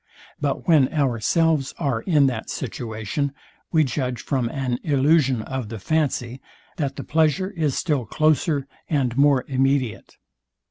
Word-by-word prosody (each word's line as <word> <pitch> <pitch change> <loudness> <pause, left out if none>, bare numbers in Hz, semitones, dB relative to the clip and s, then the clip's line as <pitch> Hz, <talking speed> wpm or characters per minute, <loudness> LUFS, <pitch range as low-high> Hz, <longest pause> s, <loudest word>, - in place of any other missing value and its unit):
But 145 -2 -2
when 150 -6 +5
ourselves 145 +2 +1
are 135 -8 -1
in 150 -3 +3
that 120 -5 -2
situation, 120 +3 -3 0.4
we 160 -2 +4
judge 125 -3 -2
from 130 -4 -1
an 130 -3 -2
illusion 140 -4 +2
of 130 -4 -5
the 115 - -5
fancy, 130 -1 -1 0.4
that 140 -3 -2
the - - -6
pleasure 160 +5 +1
is 155 -8 -1
still 145 - 0
closer 155 0 +1 0.2
and 130 -6 0
more 140 -1 +4
immediate. 135 -3 0
135 Hz, 135 wpm, -23 LUFS, 125-155 Hz, 0.4 s, when